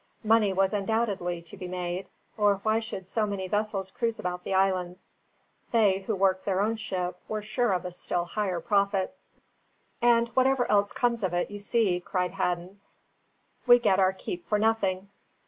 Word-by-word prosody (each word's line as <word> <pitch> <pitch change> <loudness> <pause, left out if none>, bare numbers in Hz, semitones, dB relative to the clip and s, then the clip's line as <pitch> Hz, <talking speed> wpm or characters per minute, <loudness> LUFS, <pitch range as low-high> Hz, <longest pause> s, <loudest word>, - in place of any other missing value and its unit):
Money 215 -2 +4
was 190 +1 +1
undoubtedly 195 -5 -1
to 170 - -12
be 185 -2 -7
made, 180 +1 -4 0.3
or 205 -2 +3
why 220 +1 +2
should 220 -4 -6
so 215 +3 0
many 195 -2 -3
vessels 205 -1 -2
cruise 230 +1 -1
about 180 0 -4
the - - -5
islands? 185 -1 0 0.6
they, 210 -5 +4
who 200 +2 -3
worked 190 -1 +2
their 190 -2 0
own 215 +3 +1
ship, 180 -4 -4
were 215 -1 -3
sure 225 +2 0
of 185 -1 -1
a 180 - -4
still 175 0 -2
higher 185 -1 -2
profit. 200 +2 +1 0.9
"And 235 -1 +4
whatever 260 +1 +2
else 205 -1 +3
comes 235 -1 0
of 185 -3 -1
it, 175 - -1
you 205 - -6
see," 205 -3 +1
cried 180 0 -2
Hadden, 180 +2 -3 0.9
"we 245 0 +9
get 195 -5 +2
our 190 -1 +4
keep 180 -2 -7
for 210 - +2
nothing. 200 -3 0
195 Hz, 175 wpm, -27 LUFS, 185-220 Hz, 0.9 s, we